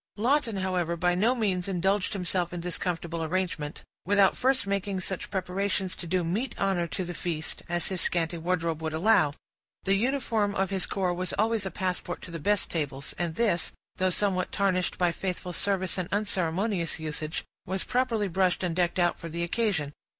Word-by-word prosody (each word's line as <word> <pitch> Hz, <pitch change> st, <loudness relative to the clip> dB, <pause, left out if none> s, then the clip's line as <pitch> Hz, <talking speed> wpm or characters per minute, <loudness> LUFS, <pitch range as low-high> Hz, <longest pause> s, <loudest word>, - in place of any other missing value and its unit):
Lawton, 235 Hz, -1 st, +2 dB
however, 180 Hz, -3 st, 0 dB
by 180 Hz, +1 st, +3 dB
no 220 Hz, +8 st, +3 dB
means 195 Hz, -6 st, 0 dB
indulged 195 Hz, +1 st, +1 dB
himself 180 Hz, -2 st, 0 dB
in 175 Hz, -1 st, -4 dB
this 175 Hz, -3 st, -2 dB
comfortable 170 Hz, -2 st, -2 dB
arrangement, 165 Hz, -3 st, -2 dB, 0.2 s
without 200 Hz, 0 st, +5 dB
first 260 Hz, -1 st, +2 dB
making 200 Hz, -1 st, -1 dB
such 185 Hz, 0 st, -3 dB
preparations 190 Hz, 0 st, -1 dB
to 175 Hz, -, -7 dB
do 180 Hz, +1 st, +1 dB
meet 205 Hz, +11 st, -2 dB
honor 190 Hz, -3 st, +1 dB
to 185 Hz, +2 st, -3 dB
the 175 Hz, -, -4 dB
feast, 160 Hz, -2 st, -3 dB
as 175 Hz, 0 st, +1 dB
his 185 Hz, -2 st, 0 dB
scanty 170 Hz, -1 st, +1 dB
wardrobe 165 Hz, -2 st, 0 dB
would 160 Hz, -1 st, -2 dB
allow. 165 Hz, -3 st, +4 dB, 0.5 s
The 195 Hz, -, +3 dB
uniform 225 Hz, -2 st, +1 dB
of 195 Hz, 0 st, +1 dB
his 190 Hz, -2 st, 0 dB
corps 185 Hz, -3 st, 0 dB
was 180 Hz, +1 st, -2 dB
always 220 Hz, -1 st, +1 dB
a -, -, -2 dB
passport 180 Hz, -2 st, -3 dB
to 180 Hz, -, -8 dB
the 165 Hz, -, -4 dB
best 205 Hz, +6 st, +1 dB
tables, 140 Hz, -4 st, -3 dB
and 170 Hz, -2 st, -1 dB
this, 210 Hz, -6 st, +1 dB, 0.2 s
though 185 Hz, 0 st, +3 dB
somewhat 185 Hz, -1 st, +1 dB
tarnished 185 Hz, -2 st, +1 dB
by 175 Hz, -1 st, +3 dB
faithful 180 Hz, 0 st, -3 dB
service 190 Hz, -1 st, 0 dB
and 180 Hz, 0 st, -2 dB
unceremonious 190 Hz, -2 st, 0 dB
usage, 155 Hz, 0 st, -3 dB, 0.2 s
was 190 Hz, +1 st, -1 dB
properly 240 Hz, -5 st, +1 dB
brushed 185 Hz, 0 st, +1 dB
and 175 Hz, -2 st, 0 dB
decked 175 Hz, 0 st, +1 dB
out 175 Hz, -1 st, +2 dB
for 165 Hz, -, -6 dB
the 170 Hz, +2 st, -2 dB
occasion. 170 Hz, -6 st, 0 dB
185 Hz, 185 wpm, -28 LUFS, 170-200 Hz, 0.5 s, without